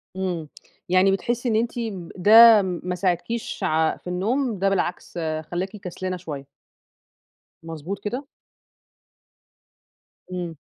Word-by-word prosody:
إمم 175 Hz, -5 st, -3 dB, 0.4 s
يعني 185 Hz, +1 st, +4 dB
بتحسي 240 Hz, +5 st, -1 dB
إن 220 Hz, -, +1 dB
أنتِ 235 Hz, +2 st, 0 dB
م 195 Hz, -7 st, -5 dB
ده 220 Hz, +3 st, +8 dB
ما 180 Hz, -1 st, -3 dB
ساعدكيش 185 Hz, +6 st, -2 dB
ع 160 Hz, -2 st, +1 dB
في -, -, -15 dB
النوم 215 Hz, +5 st, -1 dB
ده 195 Hz, 0 st, +2 dB
بالعكس 180 Hz, -2 st, -2 dB, 0.3 s
خلّاكِ 180 Hz, +2 st, -2 dB
كسلانة 185 Hz, -1 st, -5 dB
شوية؟ 145 Hz, -6 st, -7 dB, 1.2 s
مضبوط 165 Hz, +4 st, -6 dB
كده؟ 250 Hz, +7 st, -3 dB, 2.1 s
إمم. 175 Hz, -3 st, -4 dB
185 Hz, 110 wpm, -24 LUFS, 175-220 Hz, 2.1 s, ده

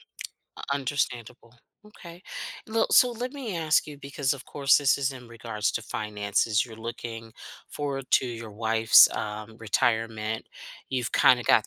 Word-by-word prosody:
U -, -, -29 dB, 0.5 s
understandable. 125 Hz, -4 st, -3 dB, 0.3 s
Okay. 175 Hz, -4 st, -13 dB, 0.4 s
Le 225 Hz, 0 st, +1 dB
so 250 Hz, -1 st, +6 dB
let 245 Hz, +3 st, -5 dB
me 245 Hz, -11 st, -5 dB
ask 160 Hz, -2 st, +2 dB
you 150 Hz, -1 st, -9 dB
because, 140 Hz, 0 st, -2 dB
of 135 Hz, -, -11 dB
course, 140 Hz, -1 st, +3 dB
this 140 Hz, -2 st, +3 dB
is 135 Hz, -1 st, 0 dB
in 125 Hz, -2 st, -11 dB
regards 115 Hz, -2 st, -3 dB
to 115 Hz, -, -3 dB
finances, 105 Hz, 0 st, -1 dB
you're 115 Hz, -2 st, -11 dB
looking 115 Hz, 0 st, -7 dB, 0.4 s
forward 140 Hz, -2 st, -4 dB
to 130 Hz, -, +4 dB
your 115 Hz, -2 st, -7 dB
wife's, 110 Hz, +1 st, +6 dB
um, 105 Hz, +1 st, -5 dB
retirement. 110 Hz, 0 st, -1 dB, 0.4 s
You've 125 Hz, -3 st, -2 dB
kinda 125 Hz, -1 st, +5 dB
got 110 Hz, -, +4 dB
120 Hz, 150 wpm, -26 LUFS, 110-140 Hz, 0.5 s, so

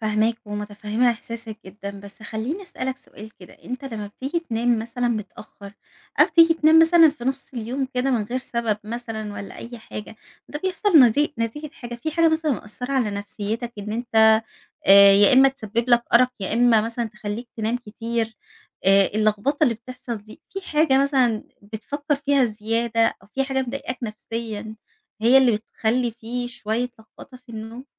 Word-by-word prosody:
فاهماك 215 Hz, +1 st, +1 dB
ومتفهمة 210 Hz, +3 st, -1 dB
إحساسك 230 Hz, -1 st, -7 dB
جدًا، 200 Hz, +1 st, -7 dB
بس 200 Hz, +2 st, -13 dB
خليني 235 Hz, -, -4 dB
أسألك 265 Hz, -7 st, -5 dB
سؤال 220 Hz, -4 st, -13 dB
كده 180 Hz, -, -13 dB
أنت 255 Hz, +3 st, -6 dB
لمّا 220 Hz, -6 st, -5 dB
بتيجي 270 Hz, +11 st, -4 dB
تنام 235 Hz, -5 st, 0 dB
مثلًا 235 Hz, +2 st, -2 dB
متأخر، 210 Hz, -2 st, -6 dB, 0.5 s
أو -, -, +8 dB
تيجي 330 Hz, -1 st, +6 dB
تنام 320 Hz, 0 st, +5 dB
مثلًا 330 Hz, 0 st, +7 dB
في 290 Hz, -5 st, -5 dB
نص 270 Hz, +1 st, -2 dB
اليوم 250 Hz, +3 st, -3 dB
كده 250 Hz, +2 st, +1 dB
من 240 Hz, -4 st, +1 dB
غير 245 Hz, +4 st, -3 dB
سبب 235 Hz, -4 st, -2 dB
مثلًا 220 Hz, -2 st, -5 dB
والّا 200 Hz, -1 st, -8 dB
أي 240 Hz, 0 st, -9 dB
حاجة، 215 Hz, -1 st, -9 dB, 0.3 s
ده 295 Hz, -, -5 dB
بيحصل 375 Hz, -2 st, +3 dB
نتي 275 Hz, +5 st, +4 dB
نتيجة 255 Hz, +7 st, -3 dB
حاجة 240 Hz, -7 st, -8 dB
في 240 Hz, +7 st, -4 dB
حاجة 330 Hz, +1 st, +3 dB
مثلًا 315 Hz, -2 st, +1 dB
مأثرة 250 Hz, +3 st, -6 dB
على 250 Hz, -6 st, +1 dB
نفسيتك، 205 Hz, +3 st, -4 dB
إن 210 Hz, +1 st, -5 dB
أنت 220 Hz, -1 st, +4 dB, 0.4 s
آآ 200 Hz, 0 st, +9 dB
يا 200 Hz, 0 st, +6 dB
إما 265 Hz, +1 st, +7 dB
تسبب 235 Hz, -2 st, -3 dB
لك 240 Hz, 0 st, +5 dB
أرق، 250 Hz, +1 st, +6 dB
يا 190 Hz, -, -3 dB
إما 230 Hz, -1 st, +4 dB
مثلًا 230 Hz, +2 st, -3 dB
تخليك 215 Hz, +2 st, -6 dB
تنام 225 Hz, +2 st, -1 dB
كتير، 225 Hz, -1 st, -4 dB, 0.5 s
آآ 195 Hz, 0 st, +5 dB
اللخبطة 215 Hz, +8 st, +1 dB
اللي 240 Hz, -5 st, +2 dB
بتحصل 240 Hz, +1 st, -7 dB
دي 215 Hz, +1 st, -14 dB
في 390 Hz, -, -5 dB
حاجة 300 Hz, -3 st, +4 dB
مثلًا 255 Hz, -6 st, +1 dB, 0.2 s
بتفكر 285 Hz, +9 st, -3 dB
فيها 280 Hz, -1 st, +2 dB
زيادة، 225 Hz, +1 st, 0 dB
أو 195 Hz, -, -20 dB
في 270 Hz, -, +1 dB
حاجة 265 Hz, 0 st, -1 dB
مضايقاك 255 Hz, 0 st, -5 dB
نفسيًا 220 Hz, -1 st, -5 dB, 0.5 s
هي 245 Hz, +4 st, +7 dB
اللي 255 Hz, -3 st, +4 dB
بتخلي 225 Hz, +3 st, -1 dB
في 240 Hz, +2 st, -5 dB
شوية 240 Hz, 0 st, -2 dB
لخبطة 230 Hz, +3 st, -14 dB
في 250 Hz, 0 st, -25 dB
النوم؟ 225 Hz, +3 st, -8 dB
235 Hz, 170 wpm, -23 LUFS, 215-260 Hz, 0.5 s, آآ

